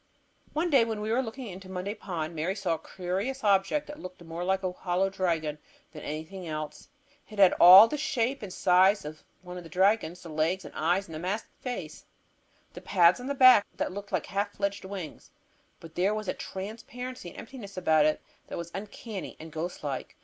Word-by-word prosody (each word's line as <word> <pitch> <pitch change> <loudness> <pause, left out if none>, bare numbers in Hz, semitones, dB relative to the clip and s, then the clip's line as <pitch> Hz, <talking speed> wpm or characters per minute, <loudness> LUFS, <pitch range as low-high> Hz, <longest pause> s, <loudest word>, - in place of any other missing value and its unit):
One 325 +3 0
day 270 -5 +6
when 225 -2 -3
we 215 +1 -2
were 245 +3 +3
looking 250 +1 -6
into 190 -2 -9
Monday 190 +2 -3
Pond, 170 -6 -5
Mary 165 +5 -1
saw 195 -4 -1
a 160 - -3
curious 195 +9 -4
object 200 +8 +2
that 295 0 -9
looked 185 0 -9
more 165 +1 -5
like 190 +1 0
a 185 - 0
hollow 180 +1 -1
dragon 165 -6 -1 0.3
than 155 -2 -9
anything 160 +5 -6
else. 155 -1 -6 0.4
It 215 - -11
had 195 -2 +7
all 190 +5 +11
the 295 +5 -3
shape 275 -3 0
and 205 -3 -6
size 185 +1 +4
of 155 +1 -8 0.2
one 180 0 -8
of 180 - -7
the 165 - -11
dragons; 185 -1 +1
the 170 - -9
legs 160 +4 0
and - - -10
eyes 175 +5 0
and 160 -1 -7
masked 200 +5 -3
face, 215 - -5 0.7
the - - -9
pads 180 0 +4
on 250 - -6
the 280 - -1
back 255 -5 +8
that - - -1
looked 200 +1 -8
like 185 -5 0
half 205 +1 -2
fledged 200 0 -2
wings. 190 -6 -7 0.5
But 165 -1 -12
there 195 +5 +1
was 215 -1 -4
a - - 0
transparency 225 +3 -7
and - - -14
emptiness 225 -6 -9
about 155 -4 +4
it 155 - 0 0.3
that - - -6
was 170 0 -6
uncanny 205 0 -7
and 160 0 -9
ghost 160 +3 -5
like. 140 -3 -4
190 Hz, 205 wpm, -28 LUFS, 170-215 Hz, 0.7 s, all